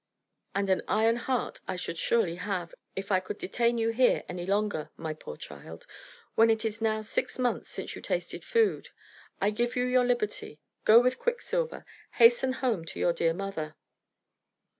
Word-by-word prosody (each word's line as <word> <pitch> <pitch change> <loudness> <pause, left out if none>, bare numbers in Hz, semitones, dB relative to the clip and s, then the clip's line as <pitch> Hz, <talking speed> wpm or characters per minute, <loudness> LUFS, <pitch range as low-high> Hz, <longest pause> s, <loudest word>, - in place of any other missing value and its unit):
And 200 0 +1
an 190 - +2
iron 225 +2 +3
heart 250 0 -2
I 185 - -2
should 180 - -4
surely 180 -8 +1
have, 180 -3 -3 0.2
if 195 +1 -4
I 185 - +4
could 185 - -6
detain 235 +4 +1
you 225 0 +1
here 245 +2 +3
any 180 0 -5
longer, 200 -5 0
my 160 -1 -4
poor 150 - -9
child, 80 +4 -10 0.5
when 225 +1 +5
it 225 0 +2
is 225 +1 -3
now 220 -1 +1
six 215 - -2
months 250 -1 -1
since - - -5
you - - -8
tasted - - -3
food. 460 -3 +1 0.5
I 200 +2 +2
give 240 +3 -1
you 250 - +1
your 250 0 +3
liberty. 225 -10 -1 0.3
Go 220 +2 +9
with 250 +1 +1
Quicksilver. - - -1 0.3
Hasten 240 +2 +5
home 240 -10 -1
to - - -7
your 175 - +3
dear 165 -1 +1
mother." 175 -6 -4
220 Hz, 175 wpm, -29 LUFS, 185-245 Hz, 0.5 s, Go